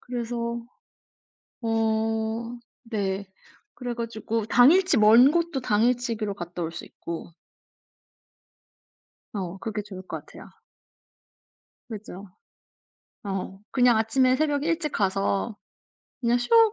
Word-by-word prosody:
그래서 235 Hz, -1 st, -3 dB, 1.0 s
어 225 Hz, +1 st, 0 dB, 0.3 s
네. 200 Hz, -4 st, -2 dB, 0.5 s
그래 245 Hz, -2 st, -4 dB
가지고 230 Hz, -1 st, -3 dB
당일치 315 Hz, +8 st, +5 dB
먼 230 Hz, +6 st, +7 dB
곳도 335 Hz, -4 st, 0 dB
당일치기로 230 Hz, -1 st, +1 dB
갔다 175 Hz, -1 st, -6 dB
올 165 Hz, -1 st, -2 dB
수 170 Hz, -, -8 dB
있고. 170 Hz, 0 st, -8 dB, 2.0 s
어 190 Hz, -2 st, -4 dB
그게 215 Hz, -2 st, -3 dB
좋을 190 Hz, -2 st, -9 dB
것 -, -, -6 dB
같아요. -, -, -13 dB, 1.4 s
그죠. 205 Hz, -3 st, -8 dB, 1.0 s
어 195 Hz, -1 st, -4 dB
그냥 245 Hz, -3 st, +4 dB
아침에 255 Hz, +4 st, +3 dB
새벽 290 Hz, 0 st, +1 dB
일찍 330 Hz, -1 st, 0 dB
가서 195 Hz, +2 st, 0 dB, 0.7 s
그냥 240 Hz, 0 st, +2 dB
쇼 450 Hz, -, +5 dB
225 Hz, 190 characters per minute, -26 LUFS, 205-250 Hz, 2.0 s, 먼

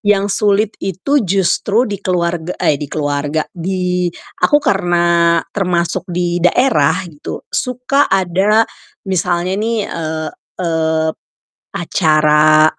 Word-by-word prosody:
Yang 205 Hz, -2 st, +2 dB
sulit 210 Hz, +1 st, +2 dB
itu 195 Hz, -, 0 dB
justru 195 Hz, +4 st, +1 dB
di 205 Hz, -5 st, -5 dB
keluarga 175 Hz, -2 st, -1 dB
eh, 145 Hz, -1 st, +1 dB
di 145 Hz, -, -5 dB
keluarga, 145 Hz, +1 st, -1 dB
di 180 Hz, 0 st, -1 dB, 0.3 s
aku 180 Hz, +11 st, +4 dB
karena 175 Hz, -7 st, +2 dB, 0.2 s
termasuk 180 Hz, -1 st, -1 dB
di 175 Hz, 0 st, -1 dB
daerah 180 Hz, -, +3 dB, 0.2 s
gitu, 145 Hz, -, -8 dB
suka 255 Hz, +3 st, 0 dB
ada 195 Hz, +4 st, +2 dB, 0.4 s
misalnya 180 Hz, -1 st, 0 dB
nih, 230 Hz, +1 st, -1 dB
eee 155 Hz, -2 st, -4 dB, 0.3 s
eee, 160 Hz, -2 st, 0 dB
p -, -, -29 dB, 0.6 s
acara 155 Hz, -2 st, +4 dB
180 Hz, 115 wpm, -16 LUFS, 160-195 Hz, 0.6 s, aku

